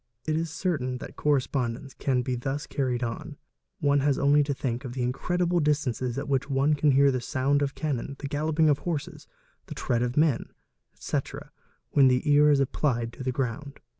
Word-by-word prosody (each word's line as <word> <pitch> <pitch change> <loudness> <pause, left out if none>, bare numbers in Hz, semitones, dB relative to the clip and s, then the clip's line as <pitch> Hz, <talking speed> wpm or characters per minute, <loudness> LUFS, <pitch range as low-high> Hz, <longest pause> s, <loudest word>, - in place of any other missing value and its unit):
It 155 - 0
is 165 +1 -1
certain 150 -6 -2
that - - -9
correspondence 135 -2 -1
can 130 -2 0
be 130 - -2
thus 135 +4 -3
carried 125 -3 -1
on; 115 -1 -5 0.4
one 145 -1 +3
has 140 0 +2
only 145 +1 +4
to 145 0 -1
think 130 -2 -3
of 125 -3 -6
the 125 -1 -2
incredible 175 +8 0
distances 140 -5 0
at 140 - -3
which 140 0 0
one 140 +2 +2
can 145 -1 +3
hear 140 +1 +5
the 130 -1 -2
sound 135 +4 0
of 140 -1 -1
cannon, 140 -3 -3
the 140 - -5
galloping 155 +2 +1
of 145 -1 +3
horses, 155 -5 -4 0.4
the - - -7
tread 120 -1 -1
of 125 +2 -2
men, 150 -5 +2 0.4
etc., - - -5 0.4
when 140 -2 +5
the 125 +3 +2
ear 150 +1 +6
is 145 -2 +4
applied 120 -4 0
to - - -8
the 130 - 0
ground. 135 +3 -4
140 Hz, 195 wpm, -27 LUFS, 125-150 Hz, 0.4 s, ear